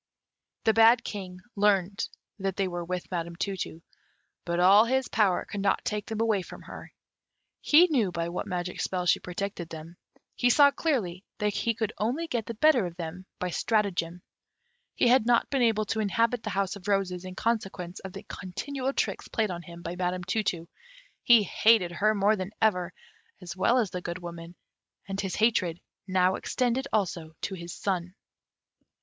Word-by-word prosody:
The 220 - +4
bad 225 +2 +6
King 185 -3 -7
learnt 200 -2 +1 0.3
that 195 -1 -2
they 195 - 0
were 175 -1 -4
with 180 +2 -5
Madam 170 -1 -3
Tu 195 +3 -2
tu, 165 -2 -6 0.6
but 170 0 -1
all 195 +5 +7
his 260 +2 +1
power 200 -5 +2
could 200 - -5
not 195 -1 +1
take 210 -1 -2
them 220 -1 -4
away 220 -4 +2
from - - -11
her. - - -10 0.7
He 320 +4 +6
knew 250 - +1
by 170 -1 -2
what 175 - -4
magic 180 0 -3
spells 180 -1 +1
she - - +1
protected 180 -1 -5
them; 165 +2 -9 0.4
he 245 - +2
saw 285 +3 +6
clearly 210 - -1
that 210 -1 0
he 230 +2 0
could 220 -1 -2
only 250 +10 0
get 235 -8 -3
the 230 - -5
better 250 -5 +4
of 170 - -9
them 180 +2 -7
by 180 -1 -3
stratagem; 180 -5 0 0.7
he - - +3
had 240 -1 +4
not 240 -1 +3
been 270 -2 +1
able 220 -2 +2
to 220 - -2
inhabit 230 +3 +1
the 215 - -4
House 195 0 -1
of 200 0 -11
Roses 190 -3 0
in 185 0 -8
consequence 195 -6 -2
of 190 - -8
the - - -8
continual 265 +9 -4
tricks - - -2
played 220 -4 -1
on 175 -1 -5
him 170 0 -11
by 170 +1 -4
Madam 180 0 -2
Tu 220 +5 0
tu; 170 -5 -2 0.5
he 235 -3 +6
hated 205 -1 +3
her 215 +5 +2
more 205 +2 +3
than 190 -2 -4
ever, 180 -5 +2 0.5
as 180 -2 -7
well 235 +6 +3
as 225 -7 +1
the 180 - -4
Good 175 0 -4
Woman; 170 -1 -9 0.5
and 195 0 -3
his 190 -2 -3
hatred 205 -7 +2 0.3
now 185 0 +3
extended 250 +6 -1
also 170 -6 -1
to 195 - -3
his 170 -2 -7
son. 180 -2 -2
195 Hz, 185 wpm, -28 LUFS, 180-225 Hz, 0.7 s, all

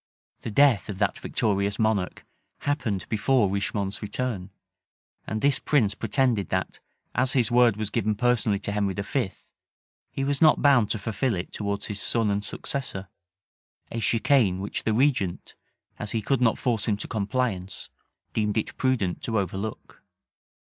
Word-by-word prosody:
The - - -4
death 115 -5 +4
of 100 - -4
that 100 0 0
victorious 100 -2 0
monarch 110 -4 0 0.4
happened 120 - -1
before 110 -1 +2
Richemont's 100 0 -2
return; 105 -3 -3 0.8
and 110 0 -2
this 140 -1 +3
prince 115 -9 +2
pretended 120 -3 +1
that, - - -2 0.3
as 130 +1 +2
his 125 -4 +2
word 120 -3 +5
was 105 -1 -3
given 110 -2 0
personally 120 -2 +2
to 100 - -2
Henry 100 -2 0
V., 105 +1 -1 0.8
he 135 - -3
was 140 0 0
not 155 -1 +6
bound 130 -7 +5
to - - 0
fulfil 110 +4 -1
it 90 0 -5
towards 100 -1 -2
his 105 -1 -4
son 115 -3 +1
and 100 0 -1
successor; 100 -7 -5 0.8
a 115 - -3
chicane 115 -4 +3
which 100 +2 -4
the 110 - +2
regent, 125 -9 +1 0.5
as 105 - -4
he 115 - 0
could 135 +3 +1
not 115 -3 +3
force 115 -5 0
him 105 -2 +1
to - - -5
compliance, 105 -3 -2 0.4
deemed 105 -1 0
it 110 - -2
prudent 120 -9 0
to 115 -2 -1
overlook. 100 +2 -4
110 Hz, 155 wpm, -26 LUFS, 100-125 Hz, 0.8 s, not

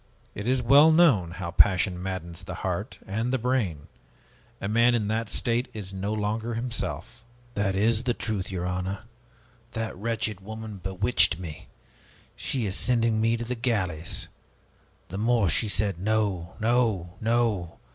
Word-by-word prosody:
It 105 +3 -5
is 130 0 +2
well 145 +6 +7
known 145 - +5
how 85 0 -5
passion 90 -1 +4
maddens 90 -3 -5
the - - -6
heart - - -3
and 110 +5 -2
the 130 - +2
brain. 115 - -1 0.7
A 100 - -3
man 115 +3 +4
in 105 -3 0
that 110 0 -1
state 120 +3 0
is 100 -3 -6
no 95 +2 -3
longer 110 +2 -2
himself." 120 0 -3 0.3
"That 100 -2 0
is 110 +3 +3
the 120 -1 0
truth, 100 -1 -3
your 90 -2 -3
honor! 90 +2 -2 0.7
That 115 -1 -3
wretched 110 0 -2
woman 110 +1 -7
bewitched 95 0 +2
me! 85 -4 -8 0.7
She 125 -5 -1
is 95 -1 -2
sending 115 -3 +2
me 115 +1 +2
to 120 - -4
the 125 - -2
galleys! 95 -10 -2 0.8
The 95 - -5
more 115 -5 +3
she 105 +8 +2
said 100 -4 0
'No, 100 -4 0
no, 110 -6 +1
no!' 110 -7 0
110 Hz, 155 wpm, -27 LUFS, 95-115 Hz, 0.8 s, well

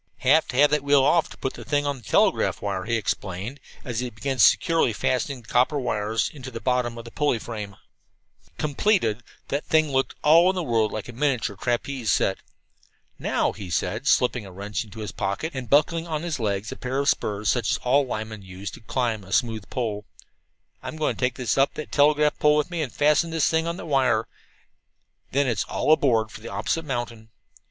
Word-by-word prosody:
"Have - - +4
to - - -6
have 145 +1 +6
that 150 -1 +2
wheel 140 -1 +4
off 165 +4 +3
to - - -12
put 130 - -3
the - - -9
thing 145 0 0
on 140 -1 -1
the - - -14
telegraph - - +2
wire," 95 -2 -3
he 115 - 0
explained, 105 +3 -3 0.3
as 120 -2 -3
he 125 0 -2
began 130 +3 -4
securely 165 - +4
fastening 130 +3 -1
the - - -20
copper 130 +4 +2
wires 110 -3 -1
into 130 -3 -8
the 115 -3 -7
bottom 125 -2 0
of 115 - -8
the 115 - -10
pulley 145 -3 +1
frame. 105 -3 -7 0.8
Completed, 145 - +1 0.3
the 140 - 0
thing 155 -2 +2
looked 135 0 0
for - - -36
all 170 +5 +6
the 180 -2 -2
world 115 -5 +1
like 110 - -5
a 120 - -8
miniature 130 -5 0
trapeze 120 +2 -1
seat. 95 - +2 0.8
"Now," - - 0
he 100 -4 -9
said, 95 - -2
slipping 125 -2 +2
a 95 - -10
wrench 100 +4 -4
into 110 0 -10
his 105 - -5
pocket, 100 +12 -3
and 130 -3 -6
buckling 165 +3 +3
on 155 -1 -3
his 165 -6 -3
legs 100 -1 -2
a - - -7
pair 130 +1 -3
of 140 0 0
spurs 105 -4 0
such 120 -4 +1
as - - +2
all 135 +3 +2
linemen 110 -4 -5
use 95 0 -8
to - - -11
climb 115 -2 -2
a 95 - -13
smooth 115 -4 0
pole, 110 -5 -3 0.8
"I'm - - -6
going 155 -1 -1
to - - -16
take 125 -1 0
this 125 +1 -1
up 135 - +2
that 155 - -6
telegraph 150 +1 +3
pole 150 0 +4
with 150 +4 -1
me 170 -2 -2
and 135 -6 -3
fasten 150 +3 +2
this 165 -2 +1
thing 160 0 +1
on 170 +1 -3
the - - -7
wire. 130 -7 +2 1.0
Then 140 +1 +2
it's 115 -6 0
'All - - 0
aboard 115 -8 +2
for - - -10
the 115 - -8
opposite 165 +6 -2
mountain.' 120 -4 -4
125 Hz, 210 wpm, -24 LUFS, 110-145 Hz, 1.0 s, have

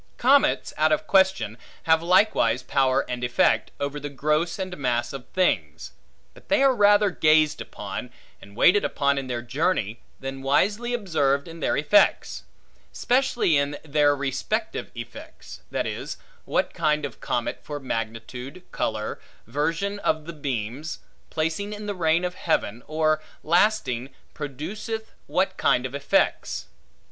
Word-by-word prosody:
Comets, 240 - +3
out 155 0 +3
of 155 - +1
question, 190 - +2 0.2
have 160 0 +4
likewise 170 - +3
power 135 0 +2
and 125 0 -4
effect, 120 0 +2
over 140 +1 -3
the 145 0 -5
gross 155 +4 0
and 185 -2 -4
mass 125 -5 -1
of 135 -2 -8
things; 185 -1 0 0.4
but - - -19
they 290 -1 +4
are 270 -1 +5
rather 205 -2 +5
gazed 155 -2 +3
upon, - - -6 0.3
and 100 0 -14
waited 190 - +5
upon 140 -1 +1
in 135 - -6
their 120 -2 -3
journey, 120 - -1 0.2
than 135 0 -6
wisely 205 - +1
observed 145 - 0
in 165 0 -9
their - - 0
effects; 150 +8 +3 0.5
specially 245 - +2
in, 140 +1 0
their 145 -1 +3
respective 140 - -2
effects; 120 0 -10
that - - -1
is, - - -5 0.3
what - - 0
kind 150 -1 +1
of 145 - -8
comet, 120 -1 -2
for 145 -1 -6
magnitude, 125 +5 -5
color, 110 -1 -2 0.3
version 165 - -1
of 155 -5 0
the 170 - -7
beams, 140 0 -4 0.3
placing 165 +6 -2
in 210 0 -7
the 205 - -2
reign 170 -1 +2
of 180 - -2
heaven, 120 - -1
or 155 0 +1 0.2
lasting, 160 - +2 0.2
produceth 200 - -5 0.2
what - - 0
kind - - +2
of - - -5
effects. - - 0
155 Hz, 145 wpm, -25 LUFS, 135-185 Hz, 0.5 s, are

